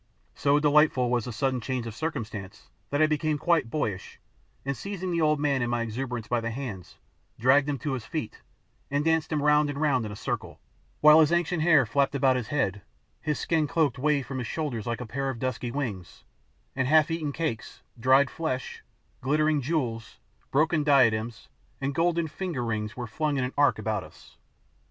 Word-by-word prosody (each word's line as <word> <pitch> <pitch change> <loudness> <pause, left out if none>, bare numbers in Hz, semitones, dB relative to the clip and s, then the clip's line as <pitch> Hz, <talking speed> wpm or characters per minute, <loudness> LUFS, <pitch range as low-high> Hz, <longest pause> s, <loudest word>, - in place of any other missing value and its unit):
So 145 +1 +2
delightful 150 -4 +3
was 120 -3 +1
the 125 - -5
sudden 130 +2 -1
change 125 0 -3
of 115 - -6
circumstances 105 - -5 0.2
that 145 +2 +2
I - - +7
became 155 0 0
quite 160 -5 +1
boyish, 105 -9 -3 0.5
and 140 0 -1
seizing 185 +2 -5
the 170 -1 0
old 150 -1 +3
man 140 -3 +1
in 120 - 0
my 120 -1 0
exuberance 120 0 -4
by 120 -1 0
the 115 - -2
hands, 115 - -7 0.4
dragged 135 +5 +4
him 145 - -1
to 145 0 -3
his 125 -4 -4
feet, 150 -1 -5 0.5
and 145 +2 0
danced 160 -1 +1
him 150 -2 0
round 150 0 +4
and 145 0 -4
round 140 -6 +2
in - - -7
a - - -7
circle, - - -4 0.4
while 150 +1 +8
his 155 -1 +4
ancient 175 -1 +1
hair 155 -5 +5
flapped 140 +5 +1
about 130 -1 +3
his 125 -3 -2
head, 105 -9 -1 0.4
his 150 -2 -1
skin 160 -3 0
cloak 145 -6 +1
waved 140 -2 +1
from 130 0 -4
his 120 - -4
shoulders 135 -9 -3
like 120 +1 -2
a - - -4
pair 135 +4 -3
of 130 - -4
dusky 125 0 -3
wings 110 - -5 0.5
and 130 -1 0
half 155 +3 +4
eaten 160 -3 -2
cakes, 150 -7 -4 0.2
dried 130 +2 +4
flesh, 130 -6 -4 0.4
glittering 150 +2 +2
jewels, 125 -6 -2 0.3
broken 155 +2 +2
diadems, 120 -6 +2 0.3
and 135 +1 -2
golden 170 +1 +1
finger 160 -6 -4
rings 105 -1 -3
were 120 - -3
flung 150 +5 -1
in 130 - 0
an 125 - -3
arc 145 0 +3
about 110 -1 -2
us. - - -16
140 Hz, 195 wpm, -27 LUFS, 120-150 Hz, 0.5 s, while